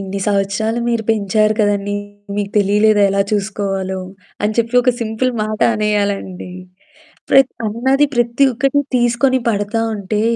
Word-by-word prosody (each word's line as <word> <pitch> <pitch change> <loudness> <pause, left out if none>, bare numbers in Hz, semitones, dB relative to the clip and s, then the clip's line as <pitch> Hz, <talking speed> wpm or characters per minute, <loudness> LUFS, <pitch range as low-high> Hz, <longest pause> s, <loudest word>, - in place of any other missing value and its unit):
"ఇన్ని 195 0 -5
సంవత్సరాలు 200 +3 0
మీరు 235 -1 0
పెంచారు 215 0 +1
కదండీ! 205 -1 0 0.4
మీకు 205 -1 -2
తెలియలేదా 205 +1 +3
ఎలా 195 0 +2
చూసుకోవాలో" 195 -2 -2 0.5
అని 215 +1 0
చెప్పి 235 +1 0
ఒక 250 - +3
సింపుల్ 230 +3 -1
మాట 215 0 -4
అనేయాలండి. 205 -3 -2 0.8
ప్రత్ 270 -1 +5
అన్నది 265 +7 +2
ప్రత్తి 240 +3 +2
ఒక్కటి 275 +4 +1 0.2
తీసుకొని 240 +2 +2
పడతా 205 +1 -1 0.2
ఉంటే 210 +1 -2
215 Hz, 125 wpm, -17 LUFS, 200-235 Hz, 0.8 s, ప్రత్